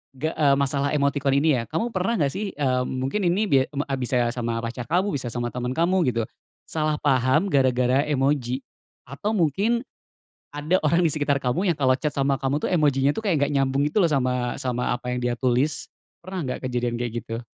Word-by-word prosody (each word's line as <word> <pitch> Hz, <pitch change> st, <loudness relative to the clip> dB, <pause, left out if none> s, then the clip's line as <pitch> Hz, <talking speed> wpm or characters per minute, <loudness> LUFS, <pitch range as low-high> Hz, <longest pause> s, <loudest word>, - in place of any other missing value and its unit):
ge 155 Hz, +4 st, -2 dB
eee, 140 Hz, -2 st, +4 dB
masalah 140 Hz, 0 st, 0 dB
emotikon 140 Hz, -1 st, +1 dB
ini 140 Hz, -2 st, +3 dB
ya. -, -, -1 dB
Kamu 225 Hz, +10 st, -2 dB
pernah 195 Hz, +6 st, 0 dB
nggak 140 Hz, -3 st, +2 dB
sih, 200 Hz, +1 st, -4 dB
eee, 130 Hz, -3 st, +1 dB
mungkin 135 Hz, +10 st, -2 dB
ini 180 Hz, +4 st, +2 dB
bia 135 Hz, -1 st, +5 dB
me 145 Hz, -, 0 dB
a 135 Hz, -, -1 dB
bisa 125 Hz, -1 st, +1 dB
sama 115 Hz, -2 st, -2 dB
pacar 120 Hz, +1 st, -5 dB
kamu, 185 Hz, +4 st, +1 dB
bisa 125 Hz, -, -5 dB
sama 120 Hz, 0 st, -2 dB
teman 125 Hz, 0 st, -3 dB
kamu 175 Hz, 0 st, +2 dB
gitu, 115 Hz, 0 st, -1 dB, 0.5 s
salah 155 Hz, -1 st, 0 dB
paham 135 Hz, +5 st, +2 dB
gara-gara 130 Hz, 0 st, +3 dB
emoji. 135 Hz, -3 st, 0 dB, 0.5 s
Atau 140 Hz, -, -3 dB
mungkin, 205 Hz, -, +1 dB, 0.7 s
ada 155 Hz, +6 st, +1 dB
orang 170 Hz, +4 st, +3 dB
di 165 Hz, -, +3 dB
sekitar 145 Hz, -2 st, 0 dB
kamu 130 Hz, +11 st, 0 dB
yang 175 Hz, -, +3 dB
kalo 130 Hz, -1 st, +3 dB
chat 150 Hz, -2 st, -2 dB
sama 135 Hz, -1 st, +1 dB
kamu 140 Hz, +3 st, -1 dB
tuh -, -, -1 dB
emojinya 145 Hz, -5 st, +3 dB
tuh 145 Hz, -, -4 dB
kayak 155 Hz, -7 st, +2 dB
nggak 145 Hz, -, +1 dB
nyambung 135 Hz, +1 st, +1 dB
gitu 215 Hz, -, 0 dB
loh 180 Hz, -, +5 dB
sama 125 Hz, -3 st, 0 dB
sama 125 Hz, -1 st, -1 dB
apa 125 Hz, 0 st, -5 dB
yang 125 Hz, -, -1 dB
dia 120 Hz, -1 st, -1 dB
tulis. 130 Hz, +4 st, 0 dB, 0.3 s
Pernah 185 Hz, +1 st, -5 dB
nggak 125 Hz, -, -4 dB
kejadian 120 Hz, -1 st, -1 dB
kayak 120 Hz, -1 st, -3 dB
gitu? 115 Hz, +1 st, -6 dB
140 Hz, 205 wpm, -24 LUFS, 125-155 Hz, 0.7 s, bia